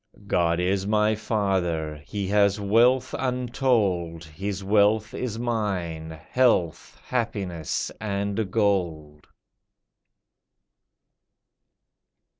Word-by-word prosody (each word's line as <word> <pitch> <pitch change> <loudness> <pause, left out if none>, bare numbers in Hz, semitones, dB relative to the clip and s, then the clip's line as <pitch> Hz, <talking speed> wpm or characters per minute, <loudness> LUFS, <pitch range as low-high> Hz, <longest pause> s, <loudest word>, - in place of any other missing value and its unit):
God 85 -3 +1
is 95 +2 0
my 105 0 +3
father, 95 -8 -1
He 100 -2 -3
has 100 0 +3
wealth 120 +5 +3
untold, 120 - 0
His 95 +5 -5
wealth 105 +2 +3
is 120 -4 -3
mine, 95 -9 -2 0.2
health, 115 - +1
happiness, 100 -10 -2
and 100 0 -2
gold." 85 -8 -1
100 Hz, 75 wpm, -25 LUFS, 85-110 Hz, 0.2 s, my